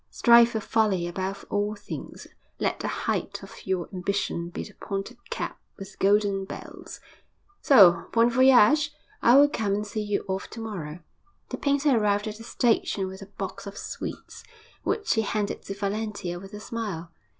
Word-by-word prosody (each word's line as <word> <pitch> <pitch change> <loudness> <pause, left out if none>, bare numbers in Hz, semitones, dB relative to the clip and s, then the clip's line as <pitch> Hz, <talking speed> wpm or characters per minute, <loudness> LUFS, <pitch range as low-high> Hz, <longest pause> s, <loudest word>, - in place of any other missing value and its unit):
Strive 235 -1 +6
for 225 - -2
folly 205 -5 +1
above 190 +2 -4
all 205 +1 0
things. 205 0 -8 0.3
Let - - -1
the - - -3
height - - -2
of - - -12
your 185 -2 -1
ambition 185 -2 -2
be - - -5
the 210 - -12
pointed 195 +6 -5
cap - - -4 0.2
with 195 0 -9
the - - -20
golden 200 0 +3
bells. 190 - -9 0.6
So, 180 -10 +6
bon 235 +1 +4
voyage! 265 +3 +5 0.3
I 240 +3 +6
will 285 +1 +8
come 215 -8 -1
and 210 +1 -2
see 210 +1 -4
you 205 -1 -2
off 190 0 -3
to 230 - -9
morrow.' 175 -8 -6 0.5
The - - -4
painter 285 0 +2
arrived 210 -1 +1
at 215 0 -5
the 225 - -11
station 230 -5 +1
with 190 +1 -8
a 195 - -9
box 195 0 -7
of 200 - -8
sweets, - - -7 0.4
which 425 - 0
he 220 - +2
handed 210 -1 -2
to 195 - -5
Valentia 200 -3 -3
with 195 +3 -10
a - - -7
smile. 205 -7 -5
205 Hz, 175 wpm, -26 LUFS, 195-225 Hz, 0.6 s, will